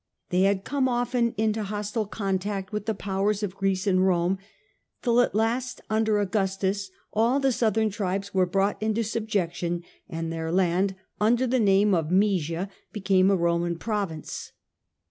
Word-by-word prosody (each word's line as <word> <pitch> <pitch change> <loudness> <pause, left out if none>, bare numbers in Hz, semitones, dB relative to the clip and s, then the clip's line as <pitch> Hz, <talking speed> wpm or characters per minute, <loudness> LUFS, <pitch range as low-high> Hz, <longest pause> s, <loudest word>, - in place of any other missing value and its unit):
They 180 +1 +2
had 195 -1 -1
come 265 +1 0
often 240 -1 0
into 220 0 +1
hostile 210 +1 -3
contact 195 -1 -2
with 210 0 -3
the 220 - 0
powers 200 +2 -1
of 195 -2 -3
Greece 195 -1 0
and 185 -2 +3
Rome, 185 0 +2 0.6
till 240 -1 +4
at 245 - 0
last, 240 +4 0
under 220 -1 +2
Augustus, 195 -1 0 0.2
all 235 +5 +3
the 270 -1 +2
southern 220 -2 +1
tribes 195 0 -3
were 185 -1 +3
brought 195 +3 0
into 220 +1 +1
subjection, 185 -6 -2 0.3
and 165 0 -4
their 160 0 -3
land, 185 +2 +2 0.2
under 235 +4 +3
the 255 +1 +1
name 200 -1 +4
of 165 -3 +1
Moesia, 185 -2 +1 0.2
became 195 -2 +3
a 200 - +4
Roman 170 0 0
province. 195 -6 -4
200 Hz, 155 wpm, -26 LUFS, 185-220 Hz, 0.6 s, till